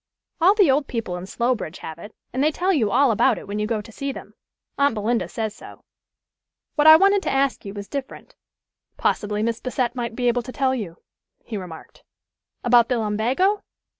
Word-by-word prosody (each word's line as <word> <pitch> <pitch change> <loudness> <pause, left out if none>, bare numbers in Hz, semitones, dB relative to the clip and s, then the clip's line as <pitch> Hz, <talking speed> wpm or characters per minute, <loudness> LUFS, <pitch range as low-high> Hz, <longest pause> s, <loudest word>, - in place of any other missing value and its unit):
All 380 +5 +6
the 390 -10 +5
old 280 +1 +1
people 225 -7 -3
in 180 +1 -7
Slowbridge 235 -6 -2
have 160 +1 -8
it, 205 - -11 0.2
and 260 +2 0
they 305 - +4
tell 370 +5 0
you 230 - +1
all 265 +4 +4
about 210 - +3
it - - -10
when 205 +1 -4
you 210 - -1
go 220 -2 -1
to 215 - -14
see 275 +5 -4
them. - - -10 0.4
Aunt 280 -4 +2
Belinda 225 +3 0
says 220 -2 -4
so. - - -13 0.9
What 300 0 +3
I 315 - +11
wanted 395 +3 +4
to - - -2
ask 270 -3 0
you 200 +1 -7
was 200 -1 -7
different" 280 -2 -7 0.6
"Possibly 210 0 0
Miss 230 0 -1
Bassett 250 -1 -1
might 240 -2 -4
be 245 0 0
able 245 0 +2
to 255 - -9
tell 265 0 0
you," 200 -10 -5 0.5
he 225 - -6
remarked. 180 -5 -9 0.6
"About 240 0 +5
the 250 - +1
lumbago? 240 - +1
240 Hz, 200 wpm, -23 LUFS, 210-275 Hz, 0.9 s, I